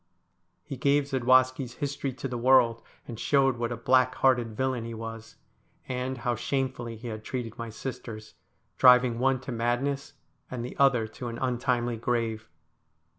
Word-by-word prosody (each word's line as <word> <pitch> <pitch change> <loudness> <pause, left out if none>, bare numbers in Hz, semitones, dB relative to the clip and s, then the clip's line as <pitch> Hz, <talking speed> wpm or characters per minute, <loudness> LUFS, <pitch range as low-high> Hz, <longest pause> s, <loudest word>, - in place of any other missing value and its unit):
He 140 -3 -7
gave 140 +3 +3
Zadwaski's 130 0 +3
history 140 -1 -3
to 135 +1 -5
the 125 - -5
world, 120 -2 +4 0.3
and 115 -3 -7
showed 135 0 +2
what 120 0 -2
a 120 - -3
black 130 +1 +3
hearted 120 -4 +2
villain 130 -3 -1
he 115 0 -6
was, 115 0 -8 0.5
and 130 0 -3
how 120 0 -1
shamefully 120 -1 -2
he 120 +2 -7
had 110 -1 -6
treated 120 -3 -5
my 115 0 -4
sisters, 110 -2 -7 0.5
driving 125 -2 +6
one 130 0 +2
to 130 - -6
madness 120 +4 -1 0.4
and 120 -2 -4
the - - -7
other 135 -5 +4
to 120 +2 -7
an 115 0 -5
untimely 120 -2 0
grave. 115 -1 -2
125 Hz, 160 wpm, -28 LUFS, 115-130 Hz, 0.5 s, driving